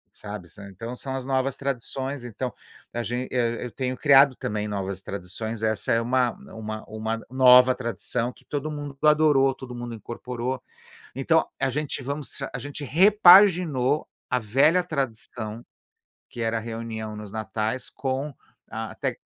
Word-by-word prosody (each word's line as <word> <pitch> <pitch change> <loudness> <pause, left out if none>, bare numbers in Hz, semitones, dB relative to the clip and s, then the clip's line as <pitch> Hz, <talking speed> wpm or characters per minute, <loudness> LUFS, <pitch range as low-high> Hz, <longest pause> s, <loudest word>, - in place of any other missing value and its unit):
Sabe, 105 -4 -8
sa 100 +4 -12
então 115 +6 -7
são 135 +1 -4
as 130 -1 -4
novas 135 0 0
tradições. 135 0 -3
Então 120 0 -4 0.4
a 120 - -1
gen 120 +3 -3
é, 120 -1 0
eu 120 - -6
tenho 130 -1 -3
criado 140 -1 +6
também 105 -1 -3
novas 100 -2 -3
tradições. 105 +4 -5
Essa 110 0 +1
é 115 - +3
uma 125 0 +2 0.2
uma 110 -1 -6
uma 110 +1 -4
nova 125 -1 +7
tradição 120 0 -3
que - - -21
todo 145 +1 -3
mundo 145 -2 -6
adorou, 150 -3 +5
todo 130 -2 -9
mundo 120 -1 -6
incorporou. 120 +3 -5 0.5
Então 160 +5 +2
a 135 - +1
gente 145 +1 -3
vamos 140 +2 -5
a 125 - -4
gente 145 +3 -6
repaginou 175 -5 +6 0.2
a 125 - +1
velha 135 - +3
tradição 120 -7 -4 0.7
que 120 - -6
era 115 0 0
a - - -4
reunião 110 -1 -5
nos 105 -1 -8
natais 110 +3 -3
com 135 +2 -3 0.4
a - - -5
tec - - -3
125 Hz, 155 wpm, -25 LUFS, 110-135 Hz, 0.7 s, nova